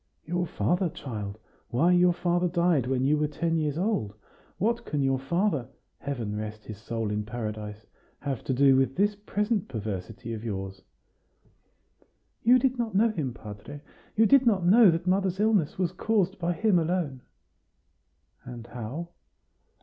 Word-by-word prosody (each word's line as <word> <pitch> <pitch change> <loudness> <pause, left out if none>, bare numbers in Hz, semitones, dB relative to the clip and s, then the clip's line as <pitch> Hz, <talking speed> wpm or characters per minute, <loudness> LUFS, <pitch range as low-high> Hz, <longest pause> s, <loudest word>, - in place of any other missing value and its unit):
"Your 175 +1 -1
father, 175 +3 0
child! 105 -9 -6 0.3
Why, 160 +9 +3
your 180 0 +5
father 175 +1 +1
died 170 -7 +2
when 130 0 +1
you 150 +2 +3
were 150 - +2
ten 165 +3 -1
years 155 -2 0
old. 175 - -1 0.4
What 230 +5 0
can 145 -2 -1
your 135 -1 +1
father 155 - 0 0.3
(Heaven 120 -7 -4
rest 105 0 -6
his 105 -2 -8
soul 115 -1 -3
in 105 0 -1
paradise!) 110 -1 -6 0.4
have 135 -4 -3
to 130 - 0
do 135 0 +5
with 135 0 +2
this 205 +2 +2
present 205 0 -1
perversity 110 -1 -5
of 110 0 -6
yours?" 95 -3 -5 1.6
"You 245 +2 +6
did 255 0 0
not 225 -4 -2
know 225 +4 +4
him, 155 -11 -2
padre; 110 +5 -10 0.3
you 225 - +5
did 275 +3 +6
not 195 -6 +3
know 210 +3 +7
that 165 +1 0
mother's 190 0 +1
illness 210 -7 +2
was 180 -2 0
caused 195 0 0
by 175 0 0
him 195 +1 +3
alone." 160 -6 -1 1.2
"And 120 -2 -9
how?" 125 +8 -6
150 Hz, 155 wpm, -27 LUFS, 115-185 Hz, 1.6 s, know